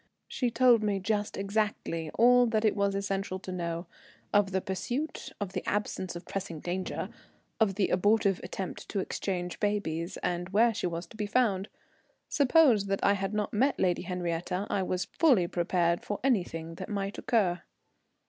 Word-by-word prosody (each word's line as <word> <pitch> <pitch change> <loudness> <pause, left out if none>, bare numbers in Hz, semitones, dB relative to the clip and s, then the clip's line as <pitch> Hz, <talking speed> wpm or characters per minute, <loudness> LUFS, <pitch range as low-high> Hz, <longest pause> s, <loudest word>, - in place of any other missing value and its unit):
She 250 - -1
told 235 -1 +5
me 205 -2 +1
just 205 +2 -1
exactly 195 -5 -1
all 245 +1 +6
that 220 -1 +1
it 215 - +3
was 200 -1 +1
essential 195 -1 -2
to 185 0 -8
know: 170 -1 -3 0.5
of 205 -1 +4
the 190 - +1
pursuit, 240 - -3
of 200 -2 -4
the - - -3
absence 190 -3 -2
of 170 - -8
pressing 185 -5 -5
danger, 180 +3 -3 0.5
of 210 -4 +3
the 200 -2 +1
abortive 200 0 +3
attempt 190 -2 -6
to 200 - -1
exchange 180 -2 -3
babies, 185 -5 -1
and 175 0 -1
where 225 +4 +4
she 185 - -1
was 170 0 -4
to - - -16
be 210 -1 -2
found. 205 -4 +1 0.6
Suppose 270 -7 +4
that 195 0 -1
I 200 - +5
had 195 +1 -2
not 210 -1 -1
met 265 +6 +2
Lady 180 -2 +2
Henriette, 175 -1 -3 0.2
I 195 - +1
was 180 -1 -1
fully 250 - +3
prepared 175 -1 +1
for 205 - -3
anything 175 -10 0
that - - -6
might 200 -1 -3
occur. 190 -7 +1
195 Hz, 170 wpm, -29 LUFS, 180-215 Hz, 0.6 s, all